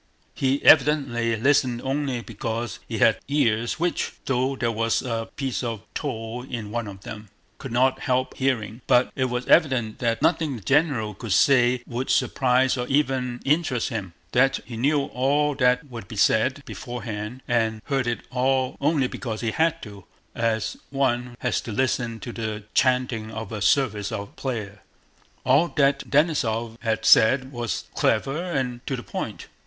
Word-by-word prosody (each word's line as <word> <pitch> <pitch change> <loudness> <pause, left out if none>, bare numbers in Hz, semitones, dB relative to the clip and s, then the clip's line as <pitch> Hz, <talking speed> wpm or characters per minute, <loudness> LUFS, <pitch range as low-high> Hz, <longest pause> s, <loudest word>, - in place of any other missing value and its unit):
He 135 +1 0
evidently 135 -6 +4
listened 130 0 +2
only 135 -2 -1
because 115 0 -4
he - - -4
had - - +4
ears 120 -5 +1
which, 175 +1 -1
though 130 +1 0
there 120 -3 -1
was 115 0 0
a 115 -2 -3
piece 135 -3 -2
of 115 -4 -4
tow 120 -3 -4
in 115 -5 -6
one 120 -1 -3
of 95 -1 -9
them, 105 0 -9 0.3
could 135 - -7
not 130 +2 +2
help 130 -1 0
hearing; 120 -3 -1
but 125 -1 +4
it 130 - +1
was 125 0 -2
evident 130 -9 +3
that 115 -2 0
nothing 160 -4 +2
the 110 - -9
general 135 - +1
could 105 +1 -3
say 125 0 +4
would 125 +2 -4
surprise 130 0 +2
or 125 0 -2
even 130 -3 0
interest 145 -5 +1
him, 100 -7 -5 0.2
that 135 +2 +3
he 120 - -8
knew 140 +5 +2
all 145 +3 +1
that 125 -1 +2
would 115 -6 -9
be 110 - -9
said 130 +7 +2
beforehand, 120 -1 -6
and 110 -2 +1
heard 135 -4 0
it 120 - -1
all 130 0 +1
only 145 -1 +2
because 115 -4 -5
he 115 -2 -1
had 160 +5 +1
to, 100 -4 -10 0.3
as 110 -1 -1
one 125 -3 -1
has 125 - 0
to 115 - -7
listen 120 -1 -1
to 120 - -6
the 110 -2 -4
chanting 125 -4 +1
of 110 -1 -6
a 105 -2 -5
service 105 -4 +1
of 100 -2 -6
prayer. 105 -6 -5 0.6
All 135 +6 +4
that 140 -1 +2
Denísov 120 -7 +1
had 110 -2 -1
said 130 +4 +5
was 120 -7 -3
clever 135 +8 +1
and 130 -8 -3
to 135 - -1
the 120 - -7
point. - - -5
125 Hz, 165 wpm, -24 LUFS, 115-135 Hz, 0.6 s, said